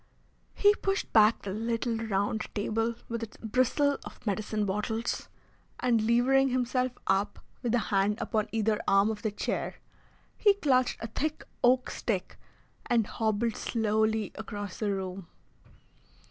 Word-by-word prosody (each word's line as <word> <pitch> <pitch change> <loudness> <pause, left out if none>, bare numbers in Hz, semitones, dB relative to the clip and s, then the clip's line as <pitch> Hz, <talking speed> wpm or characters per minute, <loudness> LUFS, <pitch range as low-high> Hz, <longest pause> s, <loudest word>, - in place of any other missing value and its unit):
He 410 0 +5
pushed 390 -1 -2
back 215 0 +5
the 195 - -4
little 230 +2 -1
round 215 -1 -1
table 225 +2 0
with 230 0 -4
its 225 -2 -7
bristle 255 +5 +1
of - - -12
medicine 210 0 -1
bottles, 210 +4 -2 0.5
and 240 -3 +2
levering 265 +3 +4
himself 255 0 0
up 200 +1 +1 0.2
with 245 -1 +1
a 235 - -1
hand 200 +2 +3
upon 215 -3 -1
either 220 -1 +1
arm 195 +2 +4
of 210 -1 -6
the 215 - 0
chair, 205 - -3 0.6
he 410 -2 +4
clutched 255 -9 +2
a - - -2
thick 305 +7 -3 0.2
oak 250 +1 +4
stick 195 -6 -3 0.5
and 235 -3 +3
hobbled 220 +1 0
slowly 220 -2 0
across 205 -2 -6
the 215 - 0
room. 190 -2 -4
225 Hz, 140 wpm, -29 LUFS, 210-245 Hz, 0.6 s, He